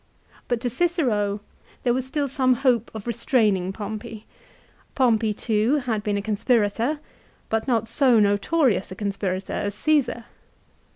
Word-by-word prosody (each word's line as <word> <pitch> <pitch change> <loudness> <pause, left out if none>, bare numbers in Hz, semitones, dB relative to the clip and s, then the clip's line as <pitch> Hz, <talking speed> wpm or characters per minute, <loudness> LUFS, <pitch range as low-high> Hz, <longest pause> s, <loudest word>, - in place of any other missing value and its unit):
But 240 -2 0
to 245 - -1
Cicero 240 - 0 0.4
there 240 - +2
was 260 +1 -2
still 285 +1 -1
some 255 -1 +2
hope 245 -3 +1
of 215 - -7
restraining 215 -6 +1
Pompey. 210 +1 -7 0.7
Pompey 230 -4 +3
too 220 +4 +1
had 245 -7 -1
been 205 -1 -1
a 200 - -3
conspirator, 225 +5 +1 0.5
but 225 +2 -1
not 230 -3 +1
so 240 0 +4
notorious 205 - +2
a - - -6
conspirator 195 -2 -3
as 205 0 -2
Caesar. 270 -2 +1
225 Hz, 135 wpm, -24 LUFS, 205-255 Hz, 0.7 s, so